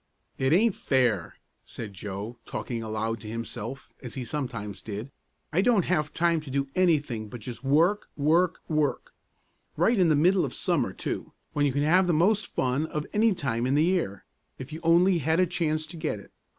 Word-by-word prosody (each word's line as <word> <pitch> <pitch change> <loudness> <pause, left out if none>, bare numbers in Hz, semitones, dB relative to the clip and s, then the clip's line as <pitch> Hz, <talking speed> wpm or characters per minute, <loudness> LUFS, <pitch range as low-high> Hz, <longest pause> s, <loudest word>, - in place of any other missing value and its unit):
"It 130 +1 +2
aint 210 +6 +4
fair!" 120 - +1 0.3
said 105 -3 -8
Joe, 105 +4 -6
talking 120 -2 -4
aloud 110 +1 -2
to 105 - -9
himself, 115 +3 -6
as 125 -4 -8
he 130 - -3
sometimes 115 -6 -4
did. 110 +5 -6 0.4
"I 175 - +4
don't 215 -4 +3
have 155 -4 0
time 170 0 +2
to 150 - -10
do 140 +1 -1
anything 145 - +1
but 120 +2 -8
just 120 +2 -8
work, 165 +9 +2
work, 165 +5 +2
work. 155 -3 -1 0.6
Right 210 +7 +3
in 175 -3 +5
the 155 - +4
middle 180 +5 +4
of - - -3
summer, - - +1
too, - - -5 0.2
when 145 -1 +2
you - - +1
can 145 +2 0
have 180 +5 +4
the 175 - +3
most 200 +6 +3
fun 130 +5 0
of 150 -1 -3
any 215 -1 +3
time 120 -5 -1
in 135 - +2
the 150 - +4
year, 170 - -1 0.3
if 130 +4 -8
you 160 - -5
only 170 +2 +4
had 160 +3 +1
a 185 - +5
chance 155 -3 -1
to 165 +2 -10
get 155 -9 -2
it! 100 - -15
150 Hz, 195 wpm, -27 LUFS, 120-170 Hz, 0.6 s, in